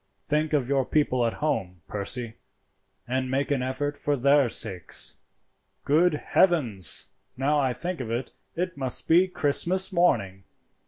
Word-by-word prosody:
"Think 155 Hz, +1 st, 0 dB
of 140 Hz, -5 st, +1 dB
your 135 Hz, -1 st, +2 dB
people 130 Hz, -4 st, +1 dB
at 115 Hz, -, -3 dB
home, 90 Hz, -, -2 dB
Percy, 110 Hz, +3 st, -4 dB, 0.7 s
and 130 Hz, +1 st, -1 dB
make 135 Hz, +2 st, -1 dB
an 140 Hz, -3 st, +1 dB
effort 130 Hz, +3 st, -2 dB
for 145 Hz, 0 st, -1 dB
their 140 Hz, 0 st, +4 dB
sakes. 95 Hz, -6 st, -3 dB, 0.7 s
Good 160 Hz, +3 st, +3 dB
heavens! 130 Hz, -, +2 dB, 0.3 s
now 145 Hz, +3 st, +1 dB
I 135 Hz, -2 st, +1 dB
think 170 Hz, +5 st, -4 dB
of 115 Hz, -3 st, -5 dB
it, 120 Hz, +3 st, -3 dB, 0.2 s
it 180 Hz, +2 st, -2 dB
must 130 Hz, -3 st, -2 dB
be 175 Hz, +3 st, +5 dB
Christmas 185 Hz, +4 st, +1 dB
morning. 100 Hz, -, +1 dB
140 Hz, 145 wpm, -26 LUFS, 120-155 Hz, 0.7 s, be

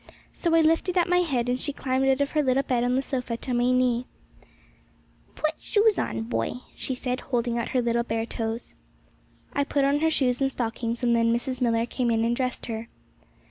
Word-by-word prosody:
So 335 Hz, -2 st, +1 dB
I 330 Hz, -, +6 dB
lifted 330 Hz, +3 st, +2 dB
up 350 Hz, -, +4 dB
my 360 Hz, 0 st, +3 dB
head, 265 Hz, -9 st, 0 dB
and 250 Hz, +1 st, 0 dB
she 290 Hz, -, 0 dB
climbed 265 Hz, -1 st, 0 dB
out 265 Hz, +1 st, +3 dB
of 280 Hz, -, 0 dB
her 305 Hz, -, +2 dB
little 265 Hz, -1 st, +2 dB
bed 245 Hz, -3 st, 0 dB
on 245 Hz, +1 st, +1 dB
the 265 Hz, -, +1 dB
sofa 250 Hz, -3 st, -3 dB
on -, -, -2 dB
to 255 Hz, +1 st, -4 dB
my 245 Hz, +1 st, +2 dB
knee. 255 Hz, -1 st, +2 dB, 1.3 s
'Put 310 Hz, 0 st, 0 dB
shoes 425 Hz, 0 st, +3 dB
on, 110 Hz, 0 st, -2 dB
boy,' 115 Hz, 0 st, -2 dB, 0.2 s
she 260 Hz, -, -3 dB
said, 250 Hz, 0 st, -2 dB
holding 240 Hz, -2 st, -1 dB
out 235 Hz, -, -3 dB
her 250 Hz, -2 st, +1 dB
little 235 Hz, 0 st, +1 dB
bare 225 Hz, -1 st, -2 dB
toes. 225 Hz, 0 st, -4 dB, 0.8 s
I 285 Hz, -, +2 dB
put 280 Hz, -1 st, +1 dB
on 280 Hz, +1 st, +2 dB
her 320 Hz, +1 st, +3 dB
shoes 255 Hz, -4 st, +1 dB
and 270 Hz, 0 st, +2 dB
stockings, 235 Hz, 0 st, -3 dB
and 240 Hz, -1 st, +3 dB
then 230 Hz, 0 st, +3 dB
Mrs. 250 Hz, +2 st, -2 dB
Millar 230 Hz, -1 st, +2 dB
came 245 Hz, 0 st, -1 dB
in 225 Hz, 0 st, +2 dB
and 235 Hz, +1 st, +1 dB
dressed 255 Hz, 0 st, -2 dB
her. 225 Hz, 0 st, -5 dB
250 Hz, 220 wpm, -26 LUFS, 235-275 Hz, 1.3 s, I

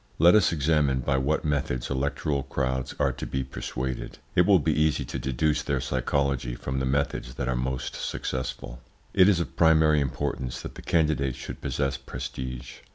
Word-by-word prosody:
Let 85 Hz, +3 st, +7 dB
us 105 Hz, -5 st, +5 dB
examine 75 Hz, -4 st, +2 dB
by 65 Hz, +2 st, +1 dB
what 75 Hz, +5 st, 0 dB
methods 70 Hz, -4 st, -1 dB
electoral 70 Hz, +1 st, 0 dB
crowds 65 Hz, -1 st, -2 dB
are -, -, +3 dB
to -, -, -6 dB
be 65 Hz, 0 st, -2 dB
persuaded. 65 Hz, 0 st, -4 dB, 0.2 s
It 90 Hz, 0 st, +4 dB
will 100 Hz, -2 st, +7 dB
be 80 Hz, -1 st, +1 dB
easy 75 Hz, 0 st, +2 dB
to -, -, -4 dB
deduce 75 Hz, +3 st, +1 dB
their 70 Hz, -3 st, -1 dB
psychology 65 Hz, -1 st, 0 dB
from 65 Hz, +2 st, -3 dB
the 65 Hz, -, -1 dB
methods 70 Hz, -2 st, -1 dB
that 65 Hz, -, -3 dB
are 65 Hz, -, +1 dB
most 65 Hz, +1 st, -2 dB
successful. 65 Hz, -1 st, -4 dB, 0.3 s
It 95 Hz, +2 st, +6 dB
is 95 Hz, -4 st, +3 dB
of 85 Hz, -, -4 dB
primary 80 Hz, -2 st, +5 dB
importance 65 Hz, -2 st, -2 dB
that -, -, -7 dB
the -, -, -10 dB
candidate 75 Hz, -6 st, +1 dB
should 65 Hz, -, -8 dB
possess 70 Hz, -1 st, -1 dB
prestige. 65 Hz, -2 st, -6 dB
70 Hz, 175 wpm, -27 LUFS, 65-75 Hz, 0.3 s, Let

